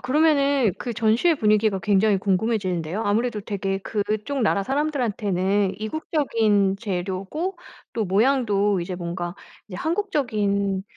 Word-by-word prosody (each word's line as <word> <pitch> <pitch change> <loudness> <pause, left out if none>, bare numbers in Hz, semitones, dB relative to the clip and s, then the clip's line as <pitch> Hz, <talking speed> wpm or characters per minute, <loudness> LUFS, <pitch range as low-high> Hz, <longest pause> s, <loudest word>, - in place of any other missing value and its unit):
그러면은 280 - +3
그 240 - -4
전시회 230 +10 +2
분위기가 215 -3 +2
굉장히 205 +2 +3
궁금해지는데요. 190 -2 -1
아무래도 220 +2 0
되게 195 -1 -3
그쪽 215 +6 -2
나라 200 -2 +1
사람들한테는 205 -9 0
이국적인 220 - +1
재료고 195 - -3 0.4
또 225 - -1
모양도 205 -2 +2
이제 180 +1 -4
뭔가 175 0 -4 0.3
이제 185 - -7
한국적인 215 - 0
210 Hz, 325 characters per minute, -23 LUFS, 195-250 Hz, 0.4 s, 그러면은